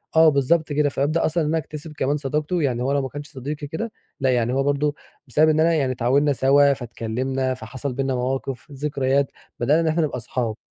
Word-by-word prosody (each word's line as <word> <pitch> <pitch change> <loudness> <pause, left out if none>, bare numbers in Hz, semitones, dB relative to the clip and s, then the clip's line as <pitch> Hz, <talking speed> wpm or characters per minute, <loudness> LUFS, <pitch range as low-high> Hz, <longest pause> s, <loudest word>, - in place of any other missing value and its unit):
آه 160 0 +7
بالضبط 150 +2 +2
كده. 145 0 +2
فابدأ 145 +4 0
أصلًا 160 +1 +1
إن 150 - -1
أنا 165 - +1
أكتسب 155 0 -6
كمان 140 +3 +1
صداقته 150 +4 -1
يعني 125 -4 0
هو 135 - 0
لو 140 - +2
ما 130 - -4
كانش 145 +2 -8
صديقي 145 +2 -5
كده 185 +10 -4 0.3
لأ، 135 -2 +2
يعني 120 0 +1
هو 135 +1 +1
برضه 145 +1 +1 0.3
بسبب 155 +5 +4
إن 155 0 +2
أنا 165 +1 +4
يعني 140 -5 +1
اتعاوننا 130 +4 +2
سوا، 140 +2 +4
فاتكلمنا، 130 +2 -2
فحصل 130 +3 -5
بيننا 135 0 -1
مواقف، 130 0 -3
ذكريات 140 -1 0 0.3
بدأنا 145 +7 +3
إن 165 - 0
إحنا 160 +2 +2
نبقى 150 - -2
اصحاب. 115 -1 -2
140 Hz, 205 wpm, -23 LUFS, 130-150 Hz, 0.3 s, آه